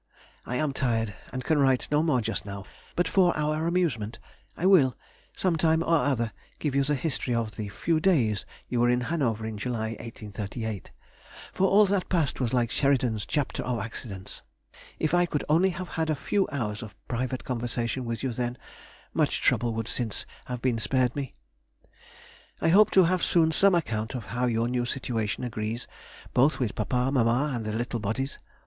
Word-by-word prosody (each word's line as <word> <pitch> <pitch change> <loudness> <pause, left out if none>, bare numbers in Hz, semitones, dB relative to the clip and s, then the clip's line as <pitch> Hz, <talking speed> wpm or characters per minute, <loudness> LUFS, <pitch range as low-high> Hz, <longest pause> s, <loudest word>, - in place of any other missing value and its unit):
I 125 - -2
am 145 +1 0
tired, 115 -6 0 0.2
and 130 0 -4
can 155 +1 +2
write 135 -2 +3
no 150 0 +4
more 150 -6 +2
just 115 +1 -2
now, 100 -1 -7 0.3
but 175 -1 +2
for 180 -3 +3
our 155 +2 0
amusement 160 -12 0 0.4
I 180 - -2
will, 150 - +5 0.4
some 180 -3 +1
time 160 +1 +3
or 165 - +1
other, 125 -7 +1 0.3
give 150 -3 -2
you 140 0 +3
the 145 +2 +1
history 130 -3 -1
of 115 -2 -2
the 105 -2 -4
few 155 - 0
days 130 - +2 0.2
you 120 - -1
were 120 - +4
in 125 0 +2
Hanover, 120 -7 -1
in 110 -2 -5
July, 110 -1 -2
1838. 110 -1 -6 0.6
For 190 - +3
all 205 +2 +6
that 195 -1 0
past 165 -7 +1
was 125 -4 0
like 120 -2 +1
Sheridan's 125 -6 +1
Chapter 145 -3 -1
of 125 -2 -1
Accidents. 105 -4 -7 0.6
If 155 +1 0
I 175 0 +4
could 150 - -1
only 170 +5 +4
have 185 0 -5
had 160 -1 -1
a 155 - +2
few 195 +7 0
hours 105 -7 -2
of 110 -3 -9
private 130 +1 -2
conversation 120 0 -2
with 115 0 -4
you 130 -3 -1
then, 120 +1 -2 0.6
much - - +1
trouble 120 -1 +2
would 115 -1 -2
since 115 -4 -2 0.2
have 125 -1 -5
been 125 -3 +1
spared 125 +1 +1
me. 140 -3 -4 1.2
I - - +2
hope 205 +5 +7
to 190 - +9
have 180 +1 +2
soon 160 -2 +4
some 195 +3 +4
account 110 -9 -1
of 120 - -5
how 125 +1 +1
your 115 0 +1
new 120 0 0
situation 120 -4 -2
agrees 115 0 -3 0.5
both 135 +3 +4
with 120 -6 -1
papa, 125 +4 0
mamma, 125 +3 +2
and 115 -3 -3
the 110 - -2
little 120 +2 -2
bodies. 115 +6 -3
125 Hz, 185 wpm, -27 LUFS, 115-155 Hz, 1.2 s, to